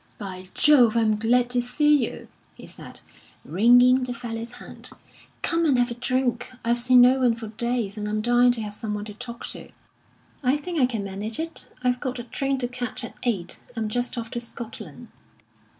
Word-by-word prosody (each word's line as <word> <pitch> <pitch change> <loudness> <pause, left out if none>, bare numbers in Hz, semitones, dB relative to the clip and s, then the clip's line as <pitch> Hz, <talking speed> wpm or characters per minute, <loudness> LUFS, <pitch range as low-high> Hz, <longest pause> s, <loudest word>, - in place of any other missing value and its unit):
"By 185 -2 -7
Jove, 245 -7 +5
I - - +4
am 215 -1 +2
glad 240 +3 +2
to 245 0 +2
see 285 +2 +3
you!" - - -11 0.3
he - - -12
said, - - -10 0.4
wringing 245 +8 +5
the 250 -1 -3
fellow's 230 0 -6
hand. - - -9 0.5
"Come 335 0 +1
and 285 -6 +3
have 245 0 +2
a - - -1
drink. 245 0 -1 0.2
I've 235 +1 +2
seen 250 +1 +6
no 255 +2 +6
one 245 -3 +3
for 225 -2 -8
days, 225 -2 -1
and 210 0 -3
I'm 215 0 -1
dying 240 +2 +4
to 230 - -3
have 210 -1 -5
some 210 0 -4
one 210 0 -5
to 210 - -8
talk 235 +2 -8
to." - - -6 0.7
"I 265 +1 +2
think 335 +2 -4
I 250 - +5
can 225 -5 -3
manage 200 +5 -5
it. 325 0 -4
I've 250 0 +1
got 255 -1 -3
a 240 - -5
train 270 +3 -2
to 250 -2 -1
catch 245 0 -5
at 235 - -7
eight; 195 -8 -2 0.2
I'm 220 -2 -2
just 245 +3 -2
off 230 -1 -5
to 240 - -3
Scotland." 235 -1 -9
240 Hz, 205 wpm, -24 LUFS, 225-250 Hz, 0.7 s, seen